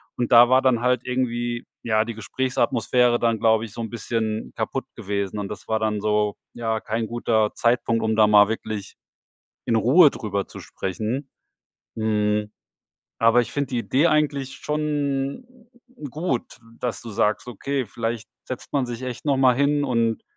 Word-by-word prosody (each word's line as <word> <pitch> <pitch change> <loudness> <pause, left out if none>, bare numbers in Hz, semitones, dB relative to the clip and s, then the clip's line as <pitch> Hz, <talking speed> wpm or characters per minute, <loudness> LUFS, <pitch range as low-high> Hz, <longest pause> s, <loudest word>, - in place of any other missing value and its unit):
Und 120 - -2
da 120 0 +9
war 130 +1 +4
dann 130 -3 +2
halt 125 0 +2
irgendwie, 120 -1 -2 0.2
ja, 110 -1 +1
die 115 - -5
Gesprächsatmosphäre 125 +1 +1
dann, 115 -2 +1
glaube 110 -1 +3
ich, 110 - -11
so 115 - -5
'n 115 - -4
bisschen 110 -1 -3
kaputt - - -3
gewesen. 100 0 -3
Und 100 - -3
das 105 - -8
war 110 0 0
dann 110 -1 0
so 105 0 +1 0.2
ja, 115 -2 -2
kein 110 +1 -2
guter 110 -2 +1
Zeitpunkt, 115 -1 +1
um 110 0 +1
da 110 -1 +5
mal 105 -1 +7
wirklich 110 -2 -5 0.7
in 115 - +2
Ruhe 145 - +6
drüber 100 -2 -3
zu - - -10
sprechen, 110 - -4 0.7
hm, 105 -1 0 0.7
aber 115 +2 +5
ich 120 - -4
finde 140 -1 -1
die 125 - -2
Idee 135 +6 +2
eigentlich 145 -4 0
schon 145 - -2 0.6
gut, 150 -2 -3 0.2
dass 125 -2 -2
du 115 - -8
sagst: 105 +2 0
Okay, 135 +3 -3
vielleicht 115 +1 -4 0.2
setzt 130 - -7
man 140 -3 +1
sich 120 0 -6
echt 125 -1 -6
noch 140 -2 +2
mal 130 -2 +5
hin 145 +1 +2
und 115 -4 0
115 Hz, 170 wpm, -23 LUFS, 110-130 Hz, 0.7 s, da